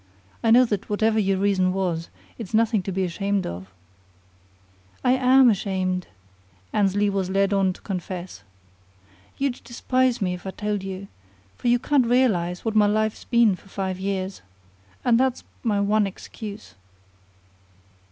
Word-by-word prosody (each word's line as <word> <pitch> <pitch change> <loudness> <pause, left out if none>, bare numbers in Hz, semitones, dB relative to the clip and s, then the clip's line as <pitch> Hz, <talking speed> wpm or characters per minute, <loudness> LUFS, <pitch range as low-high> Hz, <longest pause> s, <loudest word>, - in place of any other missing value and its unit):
I 225 - +3
know 245 +3 +7
that 205 -5 -3
whatever 220 +1 +2
your 195 -2 +1
reason 190 -2 +2
was, 175 -4 -2 0.3
it's 220 -2 -4
nothing 225 -2 +3
to 195 - -5
be 190 +1 -1
ashamed 195 +3 -1
of." 90 +2 -7 1.3
"I 250 - +4
am 260 0 +5
ashamed," 185 -4 0 0.7
Annesley 205 0 +2
was 195 -2 -1
led 195 +1 +2
on 195 -1 +2
to - - -17
confess. 185 -2 -6 1.0
"You'd 275 -2 -2
despise 255 +1 0
me 180 -3 0
if 180 +1 -8
I - - -2
told 210 +1 -3
you, 195 0 -6 0.5
for - - -4
you 240 0 +5
can't 260 0 +2
realize 205 -9 +1
what 225 - 0
my 210 -1 +5
life's 215 +1 0
been 235 -5 +4
for 195 - -19
five 190 -1 -3
years. 190 0 -3 0.6
And 235 -1 +4
that's 260 -1 0 0.2
my 210 -4 +1
one 205 +1 +2
excuse." 205 +2 -9
200 Hz, 150 wpm, -24 LUFS, 190-225 Hz, 1.3 s, know